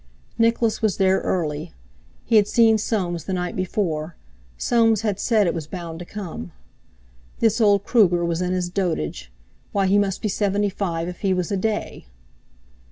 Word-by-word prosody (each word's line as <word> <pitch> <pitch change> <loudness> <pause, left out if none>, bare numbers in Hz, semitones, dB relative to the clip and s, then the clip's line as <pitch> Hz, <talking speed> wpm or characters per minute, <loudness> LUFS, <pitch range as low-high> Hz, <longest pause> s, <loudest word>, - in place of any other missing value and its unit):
Nicholas 230 -1 +2
was 215 -4 +1
there 190 0 +3
early. 155 -2 -2 0.5
He 225 - +4
had 205 -1 +4
seen 225 -1 +4
Soames 180 -6 -2
the 190 - -3
night 180 -1 -2
before—Soames 175 - -1
had 205 -3 -1
said 220 -4 +2
it 170 - +1
was 160 -3 -5
bound 170 -2 -7
to 175 - -7
come. 170 - -7 0.8
This 225 +1 +2
old 200 -2 +4
Kruger 180 -7 +3
was 170 0 -1
in 180 0 -1
his 180 -1 -1
dotage—why, 75 - -3
he 195 +2 +4
must 195 -2 -1
be - - +1
seventy 205 0 0
five 170 -4 -3
if 180 -1 -7
he 190 -2 +1
was 180 0 -2
a 200 - +1
day! 210 - -3
190 Hz, 165 wpm, -23 LUFS, 170-210 Hz, 0.8 s, He